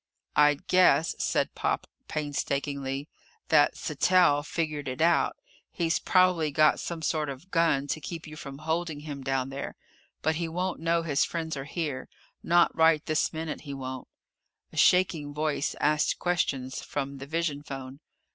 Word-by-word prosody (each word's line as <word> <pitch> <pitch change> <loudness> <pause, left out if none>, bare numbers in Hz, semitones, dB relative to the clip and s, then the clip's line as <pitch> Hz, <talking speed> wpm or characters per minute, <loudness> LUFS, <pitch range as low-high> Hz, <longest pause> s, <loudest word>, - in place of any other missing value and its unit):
"I'd 150 +3 +4
guess," 170 -5 +4
said - - 0
Pop - - -1 0.2
painstakingly, 140 -1 -2 0.4
"that - - +5
Sattell 180 -6 +3
figured 150 -3 -3
it 130 0 -4
out. 170 +2 +3 0.3
He's 165 -2 0
probably 185 -4 +3
got 155 +1 +4
some 165 -2 -5
sort 150 0 0
of 140 +7 -9
gun 165 -5 +2
to 155 - -2
keep 165 +2 -6
you 155 - -9
from 140 -2 -8
holding 160 0 -2
him 145 -2 -6
down 135 0 -1
there. 135 +1 -6 0.5
But 160 0 +1
he 170 0 -2
won't 180 +3 -2
know 165 +1 +1
his 145 -4 +2
friends 160 -2 -3
are 135 0 -5
here 145 -4 -4 0.3
not 175 0 +3
right 160 -1 +4
this 155 0 +1
minute 160 -1 -4
he 140 -3 -7
won't." 130 -1 -6 0.7
A - - -10
shaking 160 -6 +3
voice 150 -2 -1
asked 150 0 +2
questions 135 -7 -1
from 140 -1 -4
the 135 - -8
vision 160 -2 -1
phone. 135 -1 -8
150 Hz, 155 wpm, -28 LUFS, 140-165 Hz, 0.7 s, that